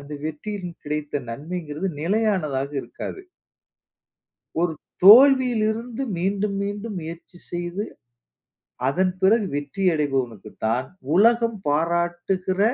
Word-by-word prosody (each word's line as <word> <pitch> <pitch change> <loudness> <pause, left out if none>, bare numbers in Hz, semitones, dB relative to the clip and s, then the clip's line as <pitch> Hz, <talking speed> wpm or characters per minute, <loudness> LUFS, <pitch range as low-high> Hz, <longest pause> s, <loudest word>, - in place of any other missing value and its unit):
அந்த 140 +1 -11
வெற்றியில் 180 +4 -5
கிடைத்த 150 -1 -2
நன்மைங்றது 155 +5 -4
நிலையானதாக 165 -8 0
இருக்காது. 385 - -7 1.4
ஒரு 175 - +1 0.3
தோல்வியிலிருந்து 240 0 +6 0.2
மீண்டும், 200 +3 0
மீண்டும் 205 +1 -4
முயற்சி 165 +2 -9
செய்து, 175 +3 -3 1.0
அதன் 185 +6 +2
பிறகு 205 +2 +4
வெற்றி 145 +6 -3
அடைபவனுக்கு 130 -8 -2 0.2
தான், 125 +4 0 0.3
உலகம் 230 +2 +4
பாராட்டுகிற 175 +4 0
180 Hz, 90 wpm, -23 LUFS, 150-210 Hz, 1.4 s, தோல்வியிலிருந்து